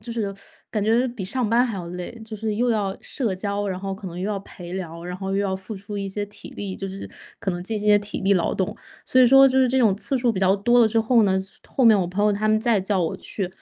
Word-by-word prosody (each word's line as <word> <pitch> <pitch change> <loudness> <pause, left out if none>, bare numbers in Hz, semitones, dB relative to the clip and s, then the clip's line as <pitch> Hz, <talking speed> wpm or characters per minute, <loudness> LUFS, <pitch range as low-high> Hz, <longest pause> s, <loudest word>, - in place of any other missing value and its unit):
就 230 +2 -8
是 210 -4 -2 0.4
感 215 - -1
觉 230 +4 +3
比 235 -5 -6
上 235 +4 -1
班 235 +3 +4
还 225 -5 -3
要 175 -2 -6
累， 180 +6 -7
就 220 0 -7
是 215 0 -2
又 245 +2 +1
要 200 -4 0
社 235 -9 -2
交， 200 +1 -2
然 185 -1 -3
后 195 0 -4
可 195 0 -9
能 175 0 -8
又 190 +3 -2
要 205 - -1
陪 175 -2 -10
聊， 170 -3 -6
然 180 0 -5
后 190 +1 -5
又 195 - 0
要 200 -1 0
付 190 +3 -6
出 200 +2 -7
一 200 -1 -3
些 205 +1 -3
体 205 - -10
力， 195 -2 -4
就 195 - -5
是 195 +1 -7 0.3
可 195 - -2
能 175 -1 -4
进 215 +3 -2
行 210 - -3
一 - - +6
些 205 - +7
体 205 0 -4
力 195 +1 +3
劳 180 -4 +1
动。 190 - -1 0.3
所 255 - +4
以 255 - +8
说 270 +2 +8
就 265 0 +3
是 260 - +4
这 260 +2 +2
种 220 -6 +4
次 265 +6 -1
数 245 -1 +2
比 190 - -3
较 190 +1 +4
多 240 +4 +3
了 225 - +5
之 225 +1 +1
后 230 +1 +4
呢， 190 -2 +2 0.3
后 260 - +1
面 220 -3 +7
我 - - 0
朋 190 +4 -1
友 210 - +4
他 210 +2 0
们 215 0 +4
再 225 -2 +2
叫 190 0 0
我 165 - -1
去， 195 -4 -4
205 Hz, 320 characters per minute, -23 LUFS, 190-225 Hz, 0.4 s, 以